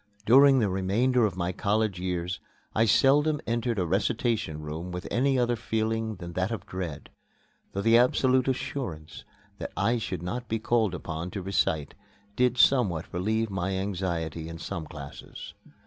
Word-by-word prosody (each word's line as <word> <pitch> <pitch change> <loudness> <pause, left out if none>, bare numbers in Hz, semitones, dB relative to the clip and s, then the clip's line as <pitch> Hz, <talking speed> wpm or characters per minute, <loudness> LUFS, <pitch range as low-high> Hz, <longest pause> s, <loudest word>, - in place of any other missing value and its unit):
During 135 +3 +7
the 110 -5 +3
remainder 110 +6 +2
of 95 -3 -7
my 90 0 -1
college 105 0 0
years 90 0 -2 0.3
I 110 - +3
seldom 145 +6 +4
entered 115 0 -1
a 90 - +1
recitation 100 -2 0
room 80 +4 -6
with 90 +1 -5
any 135 +2 +2
other 120 -1 +2
feeling 110 -1 -1
than 85 -2 -8
that 95 +2 0
of 115 -6 -5
dread, 90 -6 -6 0.6
though 100 - -2
the 115 +1 +6
absolute 130 +1 +3
assurance 120 - -4 0.3
that - - -5
I 120 +1 +2
should 90 -5 -4
not 120 +7 -4
be 115 - 0
called 110 -4 +1
upon 80 0 -5
to 95 0 -5
recite 80 -6 0 0.4
did 125 +1 +2
somewhat 105 - +3
relieve 110 +5 0
my 95 0 -1
anxiety 85 -5 -3
in 85 - -7
some 80 -1 -5
classes. 70 -2 -9
100 Hz, 160 wpm, -27 LUFS, 90-120 Hz, 0.6 s, During